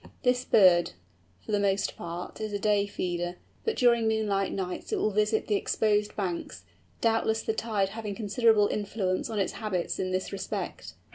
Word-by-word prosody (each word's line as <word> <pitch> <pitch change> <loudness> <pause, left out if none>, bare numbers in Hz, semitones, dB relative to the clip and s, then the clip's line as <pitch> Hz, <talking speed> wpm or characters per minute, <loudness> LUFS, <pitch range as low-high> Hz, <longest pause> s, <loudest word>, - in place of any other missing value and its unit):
This 250 0 +2
bird, 180 - +5 0.5
for - - -5
the 205 - +2
most 200 -1 +1
part, 170 +4 -7
is 215 -1 -3
a - - +1
day 205 0 +2
feeder; 175 -2 -3 0.3
but 450 - 0
during 235 -3 +4
moonlight 210 -3 +1
nights 185 -2 -4
it - - +2
will 215 - +1
visit 210 +2 +1
the 215 - -1
exposed 210 0 +1
banks, 175 - -4 0.4
doubtless 225 -1 +1
the 220 - 0
tide 215 -4 0
having 210 -1 -5
considerable 220 0 +3
influence 200 -3 -2
on 220 - -3
its 195 - 0
habits 190 -5 -2
in 185 - -1
this 185 0 -2
respect. 195 - -5
205 Hz, 170 wpm, -28 LUFS, 190-220 Hz, 0.5 s, bird